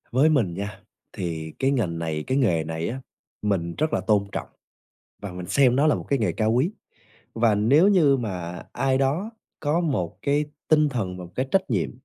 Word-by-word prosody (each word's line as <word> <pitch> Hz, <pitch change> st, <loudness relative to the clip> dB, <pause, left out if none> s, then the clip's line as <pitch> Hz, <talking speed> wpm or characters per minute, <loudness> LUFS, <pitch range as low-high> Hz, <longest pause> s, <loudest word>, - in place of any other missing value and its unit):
Với 135 Hz, +6 st, +4 dB
mình 120 Hz, -, +2 dB
nha, 100 Hz, +2 st, -6 dB, 0.3 s
thì 80 Hz, -5 st, -4 dB
cái 135 Hz, +1 st, +2 dB
ngành 95 Hz, -11 st, -1 dB
này 80 Hz, -2 st, -2 dB
cái 130 Hz, -, +1 dB
nghề 90 Hz, -, +2 dB
này 80 Hz, +1 st, -3 dB
á, 130 Hz, +3 st, -5 dB, 0.4 s
mình 90 Hz, -5 st, -1 dB
rất 155 Hz, +1 st, 0 dB
là -, -, +1 dB
tôn 105 Hz, -2 st, +2 dB
trọng -, -, -4 dB, 0.8 s
và 100 Hz, -2 st, -5 dB
mình 90 Hz, 0 st, -7 dB
xem 130 Hz, +1 st, +3 dB
nó 145 Hz, +3 st, +4 dB
là 150 Hz, -, +4 dB
một -, -, -5 dB
cái 140 Hz, -, +2 dB
nghề 105 Hz, -7 st, +1 dB
cao 110 Hz, +6 st, +1 dB
quý, 130 Hz, +9 st, +2 dB, 0.6 s
và 115 Hz, -1 st, +3 dB
nếu 135 Hz, -, +4 dB
như 160 Hz, -9 st, +5 dB
mà 90 Hz, -7 st, -5 dB
ai 135 Hz, -1 st, +1 dB
đó 145 Hz, +11 st, 0 dB, 0.3 s
có 155 Hz, +3 st, +1 dB
một 130 Hz, -, -2 dB
cái 145 Hz, +1 st, +2 dB, 0.2 s
tinh 155 Hz, -1 st, +4 dB
thần 100 Hz, -9 st, -3 dB
và 90 Hz, -, -7 dB
một 85 Hz, -, -12 dB
cái 130 Hz, -, -1 dB
trách 190 Hz, -6 st, +1 dB
nhiệm 100 Hz, -8 st, 0 dB
115 Hz, 210 wpm, -24 LUFS, 90-140 Hz, 0.8 s, như